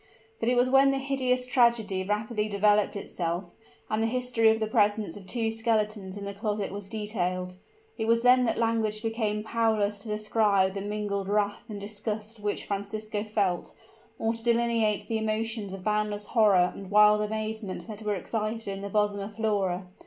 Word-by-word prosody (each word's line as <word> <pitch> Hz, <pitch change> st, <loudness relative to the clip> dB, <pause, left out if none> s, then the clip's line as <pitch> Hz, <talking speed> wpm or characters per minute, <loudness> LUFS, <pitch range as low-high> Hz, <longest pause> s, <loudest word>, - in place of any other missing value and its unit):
But 230 Hz, -, +1 dB
it 250 Hz, -, +3 dB
was 245 Hz, +1 st, +4 dB
when 270 Hz, +1 st, +5 dB
the 275 Hz, -, +1 dB
hideous 260 Hz, -2 st, 0 dB
tragedy 235 Hz, -6 st, +2 dB
rapidly 210 Hz, +2 st, -1 dB
developed 205 Hz, 0 st, +3 dB
itself, 175 Hz, -2 st, -3 dB, 0.4 s
and 215 Hz, +1 st, -1 dB
the 225 Hz, -, +2 dB
history 240 Hz, -2 st, +2 dB
of 220 Hz, 0 st, +2 dB
the 220 Hz, -, 0 dB
presence 210 Hz, -4 st, +1 dB
of 195 Hz, -2 st, -11 dB
two 225 Hz, +3 st, 0 dB
skeletons 215 Hz, -3 st, -1 dB
in 200 Hz, -, -6 dB
the 200 Hz, -, -5 dB
closet 210 Hz, 0 st, -2 dB
was 200 Hz, 0 st, -7 dB
detailed, 185 Hz, -4 st, -3 dB, 0.4 s
it 220 Hz, -, -1 dB
was 230 Hz, +1 st, +3 dB
then 250 Hz, 0 st, +6 dB
that 230 Hz, -, 0 dB
language 225 Hz, -2 st, 0 dB
became 220 Hz, -2 st, -1 dB
powerless 220 Hz, -2 st, +1 dB
to 200 Hz, -, -10 dB
describe 210 Hz, -2 st, +2 dB
the 195 Hz, -, -4 dB
mingled 205 Hz, -1 st, -3 dB
wrath 205 Hz, 0 st, 0 dB
and 210 Hz, -2 st, -5 dB
disgust 210 Hz, +2 st, -5 dB
which 205 Hz, 0 st, -2 dB
Francisco 205 Hz, +1 st, -3 dB
felt, 205 Hz, -5 st, -1 dB, 0.4 s
or 225 Hz, 0 st, 0 dB
to 230 Hz, -, -5 dB
delineate 230 Hz, -3 st, +1 dB
the 225 Hz, 0 st, -1 dB
emotions 220 Hz, -1 st, -2 dB
of 190 Hz, -1 st, -7 dB
boundless 210 Hz, 0 st, 0 dB
horror 200 Hz, -6 st, +4 dB
and 195 Hz, -2 st, -9 dB
wild 210 Hz, +1 st, +6 dB
amazement 215 Hz, -2 st, -4 dB
that 215 Hz, -1 st, -8 dB
were 210 Hz, -1 st, -1 dB
excited 215 Hz, +4 st, -3 dB
in 195 Hz, 0 st, -4 dB
the 200 Hz, -, -5 dB
bosom 205 Hz, 0 st, +1 dB
of 200 Hz, +1 st, -6 dB
Flora. 200 Hz, -4 st, 0 dB
210 Hz, 180 wpm, -28 LUFS, 200-225 Hz, 0.4 s, then